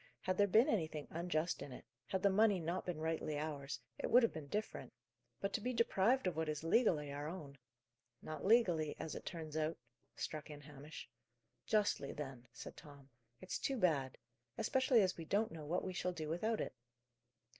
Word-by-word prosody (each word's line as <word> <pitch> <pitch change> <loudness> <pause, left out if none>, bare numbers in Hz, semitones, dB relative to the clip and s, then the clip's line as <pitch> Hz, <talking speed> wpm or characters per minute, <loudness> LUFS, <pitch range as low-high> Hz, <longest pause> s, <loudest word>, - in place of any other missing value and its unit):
Had 185 +1 -1
there 205 - +6
been 220 +7 +6
anything 160 - 0
unjust 170 0 -1
in 140 - -6
it, 125 - -9 0.2
had 190 -1 -1
the 200 - +6
money 205 -1 +5
not 170 +3 -2
been 175 -3 -1
rightly 160 -1 -1
ours, 145 -2 -3 0.2
it - - -1
would 245 +1 +7
have 230 - +3
been 155 -3 -6
different; 210 +8 -3 0.5
but 195 0 -2
to - - 0
be 250 +3 -1
deprived 230 +2 +3
of 180 -3 +1
what 160 -1 -1
is 150 0 -2
legally 165 - +3
our 145 +1 -4
own 150 -5 -7 0.3
" 120 0 -51
"Not 155 - -5
legally 180 -9 +4
as 160 - -4
it - - -7
turns 160 -3 -5
out," 155 +1 0 0.4
struck 155 0 -4
in 145 -1 -8
Hamish. 145 0 -9 0.6
"Justly, 205 -10 +2
then," 135 -4 -6
said - - -8
Tom. 140 -2 -13 0.3
"It's 185 - -3
too 270 - 0
bad 145 - +2 0.4
especially 245 0 +4
as 185 - 0
we 165 - -6
don't 210 +6 +1
know 155 -2 -7
what 175 +4 0
we 185 - -3
shall 180 0 -1
do 155 -3 -4
without 215 +7 0
it." - - -3
165 Hz, 195 wpm, -38 LUFS, 150-200 Hz, 0.6 s, would